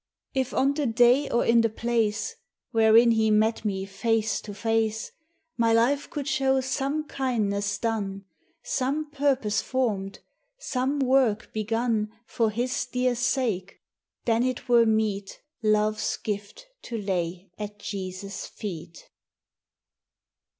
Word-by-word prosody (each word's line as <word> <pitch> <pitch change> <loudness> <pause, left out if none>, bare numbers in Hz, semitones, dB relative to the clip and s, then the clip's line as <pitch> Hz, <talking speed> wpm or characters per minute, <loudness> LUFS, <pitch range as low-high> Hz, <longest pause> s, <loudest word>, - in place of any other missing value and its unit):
If 265 -2 0
on 275 +2 +2
the 290 -2 -1
day 245 +5 +4
or 235 - +1
in 230 0 +5
the 230 - +2
place 220 -1 -1 0.4
Wherein 225 0 +6
he 220 -1 +3
met 215 +1 +2
me 195 -3 -2
face 220 +2 0
to 210 - -8
face, 220 +1 -1 0.5
My 230 -1 +3
life 260 +6 +2
could 290 -2 -4
show 270 -3 +2
some 275 +3 -1
kindness 205 -8 -1
done, 200 -3 -2 0.4
Some 290 +3 -1
purpose 265 -8 +1
formed, 210 -7 -1 0.4
some 275 - -1
work 255 -5 +2
begun 220 0 0
For 225 -1 0
his 240 +4 -1
dear 250 0 +1
sake, 230 -6 -1 0.5
then 230 -1 +2
it 255 0 -2
were 235 -2 +5
meet 215 -3 0 0.2
Love's 215 0 +1
gift 210 - -5 0.2
to 235 - -5
lay 180 -2 -3
at 210 0 -6
Jesus' 195 -1 -6
feet. 170 -4 -8
225 Hz, 125 wpm, -26 LUFS, 210-255 Hz, 0.5 s, Wherein